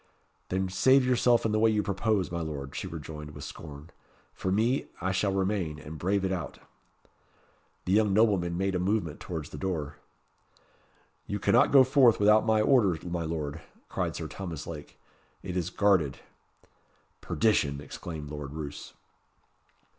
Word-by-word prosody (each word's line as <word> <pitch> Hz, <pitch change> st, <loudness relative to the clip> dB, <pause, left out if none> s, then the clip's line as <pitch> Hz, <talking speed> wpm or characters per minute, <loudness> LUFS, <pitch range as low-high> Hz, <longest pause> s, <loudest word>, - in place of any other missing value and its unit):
"Then 95 Hz, +1 st, 0 dB
save 130 Hz, +9 st, +4 dB
yourself 120 Hz, -2 st, +3 dB
in 110 Hz, -, +1 dB
the 110 Hz, -, +1 dB
way 110 Hz, +1 st, +5 dB
you 105 Hz, -1 st, +1 dB
propose, 100 Hz, -1 st, 0 dB
my 85 Hz, -1 st, -2 dB
Lord," 70 Hz, -4 st, -5 dB
she -, -, -4 dB
rejoined, 75 Hz, -1 st, -8 dB
with -, -, -8 dB
scorn. 75 Hz, 0 st, -10 dB, 0.4 s
"For 95 Hz, -, -3 dB
me, 115 Hz, +7 st, +1 dB
I 95 Hz, +2 st, -1 dB
shall 95 Hz, +1 st, +1 dB
remain, 95 Hz, -5 st, -1 dB
and 75 Hz, +1 st, -9 dB
brave 95 Hz, +2 st, 0 dB
it 95 Hz, -, -1 dB
out." 85 Hz, -8 st, -4 dB, 1.3 s
The 90 Hz, -, -1 dB
young 105 Hz, 0 st, +4 dB
nobleman 95 Hz, -5 st, +2 dB
made 95 Hz, +1 st, 0 dB
a 90 Hz, -, 0 dB
movement 90 Hz, -4 st, -1 dB
towards 80 Hz, -3 st, -6 dB
the -, -, -7 dB
door. 75 Hz, -6 st, -3 dB, 1.3 s
"You 105 Hz, -, -2 dB
cannot 115 Hz, +4 st, +3 dB
go 135 Hz, -2 st, +8 dB
forth 130 Hz, -3 st, +4 dB
without 105 Hz, +2 st, +5 dB
my 110 Hz, -1 st, +4 dB
order, 105 Hz, -8 st, +4 dB
my 85 Hz, -1 st, -2 dB
Lord," 75 Hz, -3 st, -4 dB, 0.3 s
cried -, -, -2 dB
Sir -, -, -4 dB
Thomas 85 Hz, -6 st, -6 dB
Lake. 80 Hz, -3 st, -9 dB, 0.4 s
"It 90 Hz, -2 st, -5 dB
is 90 Hz, -2 st, -1 dB
guarded." 90 Hz, -8 st, +2 dB, 1.0 s
"Perdition!" 75 Hz, -11 st, +1 dB
exclaimed 75 Hz, +1 st, -7 dB
Lord 75 Hz, -2 st, -6 dB
Roos. 75 Hz, -2 st, -7 dB
95 Hz, 155 wpm, -28 LUFS, 80-105 Hz, 1.3 s, go